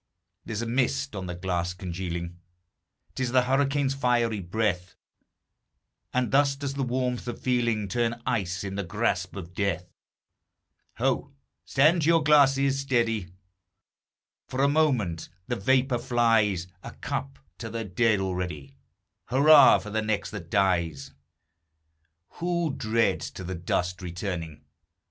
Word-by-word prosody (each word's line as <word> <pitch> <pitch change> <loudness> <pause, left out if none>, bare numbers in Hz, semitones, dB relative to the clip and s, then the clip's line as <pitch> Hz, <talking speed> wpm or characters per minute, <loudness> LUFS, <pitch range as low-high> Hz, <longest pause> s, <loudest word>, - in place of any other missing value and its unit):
There's 110 0 -3
a - - -3
mist 130 +2 0
on 95 -2 -5
the 90 - -5
glass 90 -1 -2
congealing, 85 -1 -5 0.7
'T - - -5
is 125 -2 0
the 130 -1 +5
hurricane's 135 +1 +1
fiery 120 -5 +1
breath; 90 -1 -2 1.2
And 125 -3 0
thus 140 0 +3
does 140 -1 -4
the 140 - -3
warmth 125 -1 -1
of 120 - -5
feeling 120 -4 0
Turn 120 +1 -1
ice 95 -7 -1
in 95 -1 -5
the 100 +1 -3
grasp 90 -1 -1
of 90 -3 -8
Death. 90 -3 -2 1.0
Ho! 135 +3 -1 0.3
stand 155 +5 +3
to 150 - +1
your 165 -1 +4
glasses, 140 -2 +4
steady! 115 -7 0 1.2
For 130 +1 -1
a - - +5
moment 130 - +1 0.2
the 120 - -1
vapor 130 +3 +2
flies; 115 -7 +2 0.2
A - - -9
cup 70 0 -5 0.2
to 115 - -5
the 115 0 -4
dead 105 +2 +2
already 90 -7 -4 0.5
Hurrah 140 +2 +7
for 105 - -8
the 110 +1 0
next 105 -1 -2
that 90 -6 -8
dies! 85 -8 0 1.3
Who 170 -3 0
dreads 115 +1 0
to - - -9
the 95 +1 -4
dust 90 +1 -2
returning? 85 -4 -5
115 Hz, 135 wpm, -27 LUFS, 90-130 Hz, 1.3 s, Hurrah